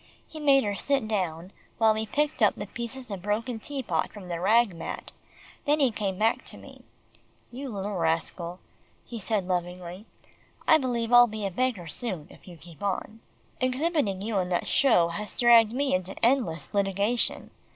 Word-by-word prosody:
He 315 - -9
made 275 -2 +5
her 205 -1 -1
sit 270 +2 0
down, 180 -4 -2 0.3
while 220 -1 +5
he 220 0 -3
picked 295 +3 -1
up 210 - +5
the 205 - -5
pieces 235 +3 -7
of 195 -2 -5
broken 225 +4 -2
tea 275 +3 -5
pot 165 -7 -1
from 200 -4 -10
the 170 -1 -3
rag 215 +2 +4
mat, 165 - -6 0.5
then 295 +1 +3
he 270 -4 +4
came 200 -3 -3
back 220 +3 +1
to - - -6
me. - - -14 0.7
"You 265 +3 -6
little 205 -1 -4
rascal," 170 +1 -2 0.5
he 235 - -7
said 205 -2 -1
lovingly, 180 +2 -4 0.6
"I 315 - +7
believe 240 -3 -1
I'll 245 0 +9
be 215 -2 -5
a 195 - -2
beggar 235 -3 -1
soon, 175 -1 -4
if - - -17
you 175 -2 -11
keep 165 +2 -15
on. 200 +2 -3 0.4
Exhibiting 255 - 0
you 215 -2 0
in 180 -1 -1
that 175 - -1
show 200 -12 +4
has 210 +5 -5
dragged 235 -2 +6
me 275 +2 0
into 185 +1 -1
endless 235 -11 0
litigation. 200 +4 0
210 Hz, 180 wpm, -27 LUFS, 185-245 Hz, 0.7 s, I'll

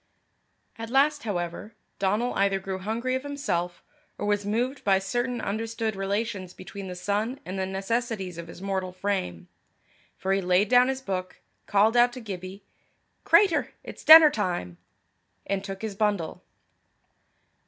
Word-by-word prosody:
At 225 0 -5
last, 285 +2 +2
however, 180 +1 -4 0.2
Donal 210 +6 0
either 195 -1 +1
grew 190 0 -5
hungry 230 +6 -2
of 260 - 0
himself, 260 -12 -3 0.3
or - - -4
was 205 -1 0
moved 245 +6 -1
by 195 -1 +4
certain 240 +6 -2
understood 225 +1 -3
relations 195 -1 -3
between 195 +1 -8
the 180 - -6
sun 205 +8 -2
and 185 +1 -5
the 190 - -1
necessities 195 -2 -3
of 170 - -7
his 175 +3 -11
mortal 190 -2 -2
frame; 185 - -3 0.7
for 190 +1 -1
he 195 - +1
laid 185 +3 +2
down 250 0 +6
his 265 0 -3
book, 185 -3 -4 0.3
called 210 +3 +3
out 240 0 +5
to 255 - -7
Gibbie, 190 -3 -7 0.6
"Cratur, 355 -8 +4
it's - - -10
denner 315 -1 +10
time," 175 - -3 0.7
and 195 -1 -2
took 195 +1 -7
his 220 -2 -3
bundle. 200 -5 -1
200 Hz, 150 wpm, -26 LUFS, 190-235 Hz, 0.7 s, denner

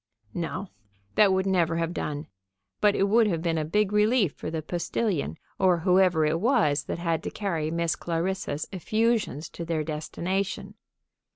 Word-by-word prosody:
No; 175 +3 -4 0.4
that 205 -2 +5
would 190 0 +1
never 175 -4 +2
have 165 0 -1
done, 150 -2 -3 0.5
but 205 -1 +4
it - - +2
would 225 +2 +4
have 165 -5 -1
been 165 -2 +1
a - - 0
big 205 +6 +1
relief 210 - +3
for - - -6
the 160 -1 -3
postilion, 175 - -2 0.2
or 180 -3 +3
whoever 180 -3 +4
it 155 +2 +1
was 155 - +2
that - - -3
had 165 -2 -1
to - - -4
carry 165 -7 -2
Miss 170 0 0
Clarissa's 170 -2 -2
effusions 215 - 0
to 170 - -7
their 165 -2 -1
destination. 185 +6 -3
175 Hz, 165 wpm, -27 LUFS, 160-195 Hz, 0.5 s, that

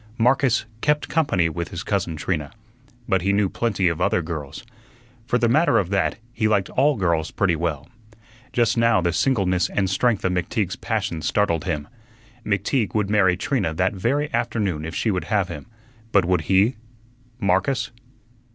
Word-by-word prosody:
Marcus 125 0 +2 0.2
"kept 150 0 +1
company" 140 - +2
with 85 +1 -4
his 90 - -6
cousin 95 -5 -1
Trina, 75 -1 -2 0.6
but 95 -1 +2
he 100 +3 +1
knew 100 -1 +2
plenty 105 -5 0
of 85 -2 -1
other 90 - +2
girls. 75 -1 -6 0.6
For 125 - +2
the 120 - +2
matter 155 +8 +3
of 95 -1 0
that, 95 -4 +1 0.2
he 110 -3 +1
liked 100 -3 +1
all 145 +2 +3
girls 85 -5 0
pretty 95 -4 +1
well. 80 -3 -3 0.6
Just 120 0 +1
now 115 -2 +4
the 85 -1 0
singleness 90 - +1
and 95 -2 0
strength 105 +3 +1
of 95 - +2
McTeague's 90 +2 -1
passion 100 -8 -2
startled 85 0 0
him. 75 -1 -2 0.6
McTeague 105 +3 0
would 105 -2 0
marry 95 -4 +3
Trina 120 - -1
that 95 +4 +1
very 140 - -1
afternoon 95 -9 -1
if 80 - -6
she 110 - 0
would 90 -2 -2
have 100 -4 0
him; 75 -4 -8 0.4
but 100 -5 +4
would 90 -1 +1
he 100 +6 +3 0.6
Marcus? 100 +8 +1
95 Hz, 170 wpm, -23 LUFS, 85-115 Hz, 0.6 s, now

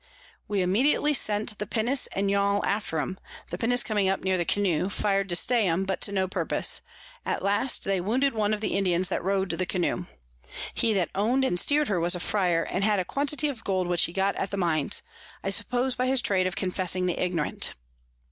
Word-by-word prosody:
We 200 -3 0
immediately 265 +10 +2
sent 215 -3 +1
the 210 - -4
Pinnace 240 +4 +1
and 200 +1 0
Yall 200 0 +1
after 200 -6 -1
'em; 185 +5 -3 0.3
the - - -3
Pinnace 245 +2 +2
coming 205 -3 +1
up 195 - -1
near 190 0 +1
the 175 -2 0
Canoe, 190 -2 0
fir'd 195 -1 +2
to 175 - +1
stay 230 +3 +2
'em, 180 +3 0
but 190 -1 -3
to - - +1
no 190 -2 0
purpose; - - 0 0.4
at - - -2
last 205 +6 +1
they 195 -2 0
wounded 255 +9 +1
one 215 -2 0
of 210 -1 -1
the 215 - -1
Indians 185 -2 +1
that - - -2
row'd 190 -1 0
in 165 - -5
the 185 - +1
Canoe. 180 -1 -1 0.7
He 225 - +1
that 185 -5 0
own'd 240 +7 +1
and 180 -9 0
steer'd 295 +6 +2
her 190 -4 +1
was 175 +2 +2
a - - -4
Fryar, 175 -3 +1
and 190 - -2
had 210 0 +3
a 185 - -1
Quantity 290 - 0
of 255 -6 -5
Gold 185 -2 0
which 175 -1 +3
he - - -6
got 195 +2 0
at 195 - -2
the 200 - -4
Mines, 160 -6 0 0.4
I 195 - -1
suppose 245 +6 0
by 255 +1 -1
his 265 0 +3
Trade 185 -2 +2
of 185 - -4
confessing 185 -1 0
the 180 - -1
Ignorant. 175 -4 -1
195 Hz, 220 wpm, -26 LUFS, 180-220 Hz, 0.7 s, had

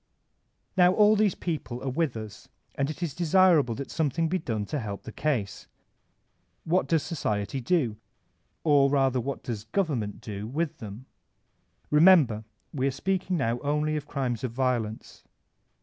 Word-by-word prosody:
Now 180 -1 +5
all 210 +1 +5
these 210 -3 +2
people 130 -8 -4
are 135 - -1
with 150 -3 -1
us, 110 -2 -9 0.2
and 140 0 -1
it 155 +3 -5
is 160 -5 -2
desirable 170 -7 +4
that 140 +2 -6
something 160 +1 0
be 185 +2 0
done 110 -8 -3
to 150 - -3
help 105 -4 -6
the 125 - -8
case. 115 -9 -2 1.0
What 175 +3 +1
does 165 -3 +2
Society 120 - -2
do? 125 -7 +1 0.7
Or 145 -3 +5
rather 135 -2 +2
what 140 +3 -5
does 110 -3 -5
Government 125 - -1
do 105 0 -6
widi 155 +4 -2
them? 110 +2 -9 0.9
Remember 150 - +5 0.3
we 135 -2 0
are - - +1
speaking 185 +4 -1
now 120 -4 0
only 150 +2 0
of 150 -1 -4
crimes 130 -4 -2
of 125 - -2
violence. 120 -3 -2
140 Hz, 155 wpm, -27 LUFS, 115-165 Hz, 1.0 s, Now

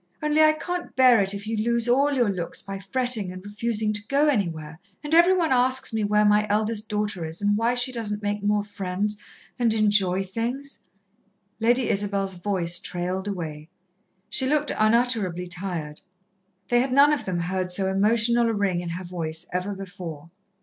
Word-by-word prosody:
only 300 +1 +3
I 310 0 +6
can't 350 +3 -5
bear 255 -4 +6
it 195 +1 0
if 200 +1 -6
you 225 +1 -2
lose 235 +2 +1
all 275 +4 +3
your 245 -7 +2
looks 175 -3 -3
by 195 0 -6
frettin' 215 0 0
and 185 +1 -10
refusin' 215 +1 -1
to 205 0 -4
go 280 +3 +2
anywhere, 165 - -1 0.2
and 295 +1 -4
every 345 +3 +6
one 330 -4 +1
asks 255 -1 +2
me 220 -1 0
where 210 +1 +3
my 210 0 +3
eldest 215 +1 0
daughter 210 -4 -2
is 160 +1 -4
and 205 0 +1
why 230 +3 +1
she 245 +1 +1
doesn't 215 -4 -3
make 205 0 -2
more 205 0 +1
friends, 205 +1 -2 0.4
and 230 -2 +2
enjoy 200 -3 +2
things 240 +8 -4 0.4
" 200 -3 -44
Lady 240 +1 +2
Isabel's 195 -1 -1
voice 175 -2 -1
trailed 180 +2 -4
away. 160 -5 -5 0.6
She 260 - 0
looked 295 +1 +1
unutterably 215 -5 +1
tired. 175 -4 -5 0.7
They 240 0 +4
had 260 +1 -2
none 285 +3 +6
of 265 -7 -2
them 185 -2 -2
heard 180 +1 -2
so 190 +1 -1
emotional 230 +4 +2
a - - 0
ring 200 -4 0
in 175 -1 -5
her 180 +2 -5
voice 165 -2 -4
ever 185 +3 -2
before. 175 -5 -8
205 Hz, 185 wpm, -24 LUFS, 185-240 Hz, 0.7 s, I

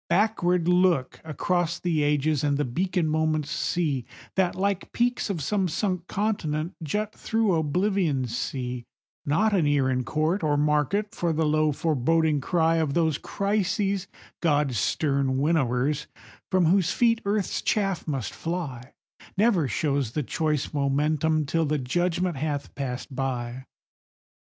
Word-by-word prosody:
Backward 180 -2 +2
look 180 -6 +2
across 170 +3 -1
the 165 -4 0
ages 150 0 +1
and 145 -1 +2
the 145 - 0
beacon 180 +7 0
moments 155 -1 0
see, 160 -8 0 0.3
That, 185 -2 +1
like 200 0 -1
peaks 245 -1 0
of 170 -7 -2
some 195 +4 +1
sunk 180 0 -2
continent, 175 -6 -1
jut 210 +7 -2
through 220 -3 0
Oblivion's 160 - 0
sea; 125 -2 -4 0.4
Not 205 +9 +2
an 175 -7 +3
ear 140 -3 +2
in 130 0 0
court 155 +8 0
or 150 -2 +1
market 150 - +1
for 175 -5 -1
the 160 0 +1
low 155 0 +2
foreboding 155 +1 +1
cry 165 +2 +2
Of 155 -4 0
those 160 -4 +2
Crises, 200 -1 -1 0.3
God's 145 - +2
stern 140 -1 +1
winnowers, 140 -1 +1 0.4
from 185 -2 +3
whose 180 +1 +3
feet 230 -1 +2
earth's 200 -1 -1
chaff 195 -6 0
must 135 -7 -3
fly; 145 -8 -5 0.4
Never 200 - +3
shows 140 -2 -1
the 150 - -1
choice 155 +1 -1
momentous 150 +2 +1
till 165 +4 +1
the 150 +1 +1
judgment 175 +5 0
hath 145 0 -3
passed 130 -1 -5
by. 130 -1 -3
160 Hz, 140 wpm, -26 LUFS, 140-180 Hz, 0.4 s, an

